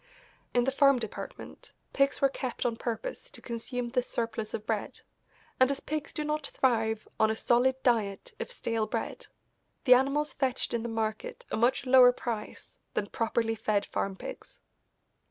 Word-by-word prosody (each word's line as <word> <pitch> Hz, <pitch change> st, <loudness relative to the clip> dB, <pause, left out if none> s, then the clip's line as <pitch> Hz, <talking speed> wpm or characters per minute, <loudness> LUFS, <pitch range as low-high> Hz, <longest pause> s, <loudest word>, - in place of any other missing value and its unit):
In 245 Hz, -, +5 dB
the 270 Hz, -, +1 dB
farm 275 Hz, 0 st, +5 dB
department 225 Hz, -3 st, -7 dB, 0.2 s
pigs 275 Hz, 0 st, +2 dB
were 275 Hz, -, +5 dB
kept 255 Hz, -2 st, -4 dB
on 235 Hz, -2 st, +1 dB
purpose 240 Hz, -, -4 dB
to -, -, -10 dB
consume 240 Hz, +1 st, -4 dB
this 250 Hz, 0 st, 0 dB
surplus 230 Hz, -2 st, -3 dB
of 210 Hz, -, -6 dB
bread, 220 Hz, -2 st, -3 dB, 0.6 s
and 260 Hz, 0 st, +6 dB
as 280 Hz, -1 st, -1 dB
pigs 310 Hz, 0 st, -4 dB
do 305 Hz, -, -3 dB
not 300 Hz, -1 st, -1 dB
thrive 225 Hz, -4 st, +1 dB
on 220 Hz, -, +5 dB
a 220 Hz, -, 0 dB
solid 245 Hz, +3 st, +3 dB
diet 225 Hz, -, +1 dB
of -, -, -4 dB
stale 230 Hz, -, -1 dB
bread -, -, -4 dB, 0.6 s
the 250 Hz, -, +8 dB
animals 275 Hz, +4 st, +2 dB
fetched 260 Hz, -3 st, -1 dB
in 235 Hz, -, 0 dB
the 235 Hz, -, -4 dB
market 220 Hz, -1 st, -3 dB
a -, -, 0 dB
much 240 Hz, +4 st, +2 dB
lower 250 Hz, -1 st, +8 dB
price 235 Hz, -3 st, -6 dB, 0.2 s
than 200 Hz, -, -1 dB
properly 225 Hz, 0 st, 0 dB
fed 215 Hz, -2 st, 0 dB
farm 195 Hz, -1 st, -2 dB
pigs. -, -, -9 dB
240 Hz, 170 wpm, -29 LUFS, 225-270 Hz, 0.6 s, the